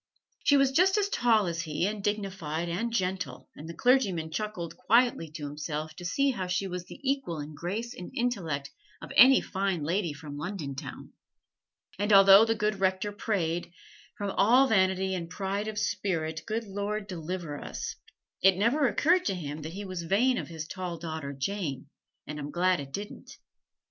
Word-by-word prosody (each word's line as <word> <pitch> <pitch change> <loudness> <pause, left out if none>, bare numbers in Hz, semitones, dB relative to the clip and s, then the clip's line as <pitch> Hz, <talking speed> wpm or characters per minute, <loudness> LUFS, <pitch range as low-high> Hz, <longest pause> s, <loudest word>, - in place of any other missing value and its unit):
She 285 - +5
was 275 -1 +4
just 370 +7 +4
as 405 -1 +1
tall 225 - +3
as 170 -1 -2
he, 160 +1 -1
and 205 0 -3
dignified 190 -6 -2
and 195 +8 -2
gentle: 185 - -2
and 155 +3 -9
the 170 - -7
clergyman 195 -10 +2
chuckled 185 -2 -4
quietly 235 -7 +2
to 155 -2 -7
himself 150 +1 -4
to 175 - -8
see 275 +10 +2
how 190 -7 -3
she 180 +2 0
was 180 -2 -5
the - - -11
equal 270 - -1
in 150 +1 -7
grace 205 +10 -4
and 180 - -8
intellect 165 - -2 0.3
of - - -9
any 260 +4 +8
Fine 190 -4 -2
Lady 170 +2 0
from 145 0 -8
London 160 -4 -4
town. 135 - -8 0.9
And 205 +1 0
although 195 +1 +9
the 225 0 +1
good 210 -1 -1
Rector 190 +2 +1
prayed, 175 -6 -2 0.5
"From 205 -2 -2
all 245 +8 +5
vanity 190 -3 +2
and 170 -3 -4
pride 195 +3 -3
of 215 -1 -5
spirit, 165 -7 -1
good 225 +2 -1
Lord, 205 +1 -3
deliver 170 -4 -5
us," - - -5 0.5
it 190 -1 +5
never 250 +8 +3
occurred 340 - +3
to 195 - 0
him 150 -3 -5
that 160 +2 -6
he 200 +2 -6
was 185 -2 -4
vain 225 +9 +2
of - - -5
his 160 -2 -6
tall 180 -1 -5
daughter 160 -4 -5
Jane, 140 -1 -3 0.4
and 150 0 -6
I'm 145 0 -5
glad 180 +3 +2
it 140 -1 -7
didn't. 205 +7 -7
190 Hz, 180 wpm, -29 LUFS, 165-215 Hz, 0.9 s, although